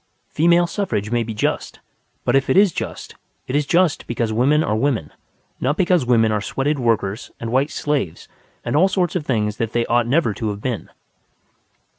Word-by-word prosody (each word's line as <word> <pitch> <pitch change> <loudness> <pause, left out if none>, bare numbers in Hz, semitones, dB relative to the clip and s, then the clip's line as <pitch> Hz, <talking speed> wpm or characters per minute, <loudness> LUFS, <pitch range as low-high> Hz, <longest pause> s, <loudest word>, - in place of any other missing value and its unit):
Female 170 +2 +3
suffrage 170 - -2
may 120 0 +1
be 115 -1 -4
just. - - -2 0.5
But 120 - +2
if 135 0 +2
it - - +3
is 200 -2 +6
just, - - -6 0.3
it 130 - -4
is 145 -1 +1
just 175 -2 +2
because 115 -2 -1
women 140 +7 +3
are 105 - 0
women, 115 - -1 0.5
not 145 +5 0
because 180 -7 +2
women 115 -3 +4
are 105 -1 0
sweated 140 +6 -1
workers 110 -3 -1
and 115 -1 -4
white 135 +4 +2
slaves 145 - -2 0.4
and - - -1
all 175 +6 +5
sorts 185 -3 0
of 160 -5 -2
things 105 -4 0
that 115 -1 -3
they 120 0 +1
ought 120 0 +1
never 135 -3 +2
to 110 +1 -3
have 100 -1 -4
been. 120 0 -4
125 Hz, 190 wpm, -20 LUFS, 110-150 Hz, 0.5 s, is